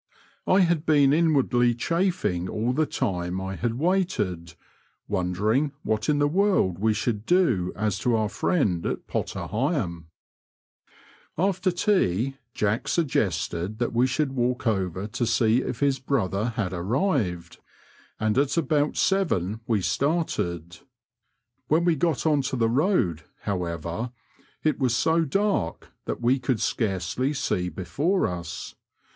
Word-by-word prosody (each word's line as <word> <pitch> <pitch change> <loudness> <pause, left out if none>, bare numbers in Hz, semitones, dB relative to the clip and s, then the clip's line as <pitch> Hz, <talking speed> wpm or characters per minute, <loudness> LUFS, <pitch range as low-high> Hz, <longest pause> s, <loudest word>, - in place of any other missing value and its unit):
I 190 +1 +5
had 170 -3 +2
been 145 -4 +4
inwardly 135 -7 +3
chafing 165 - 0
all 115 +3 -1
the 155 +3 +1
time 90 -6 -2
I 95 0 -4
had 115 +1 -2
waited, 125 - -1 0.5
wondering 105 +9 0
what 110 +3 -1
in 150 - +3
the 145 0 +3
world 175 - +2
we 110 +2 +2
should 105 0 -1
do 120 - +2
as 100 -1 -1
to 120 +5 +1
our 110 -1 +1
friend 105 - 0
at - - -3
Potter - - -3
Heigham, 105 - -2 1.3
After 185 +2 +1
tea 135 - +1 0.2
Jack 105 +2 0
suggested 100 - -1
that 120 0 -1
we 120 +2 +3
should 135 +2 0
walk 125 -1 -1
over 95 -4 -1
to 115 +3 -2
see 115 +1 +3
if 125 - -5
his 140 -2 +2
brother 110 -7 0
had 95 -5 -2
arrived, 95 - -1 0.6
and 110 +3 +1
at 140 +3 +1
about 150 -1 +1
seven 110 - +1
we 110 -4 +1
started. 90 - -1 0.9
When 160 +5 +2
we 170 -2 +3
got 160 0 0
on 150 -3 +3
to - - -2
the 115 -2 +2
road, 120 - +1 0.2
however, 90 +4 -3 0.5
it 155 -1 +1
was 125 -3 +2
so 165 0 +2
dark 195 - -1 0.2
that - - -3
we 125 +3 +3
could 125 -2 -1
scarcely 110 +7 -1
see 90 -8 -1
before 115 - 0
us. 90 0 -5
120 Hz, 140 wpm, -25 LUFS, 95-150 Hz, 1.3 s, I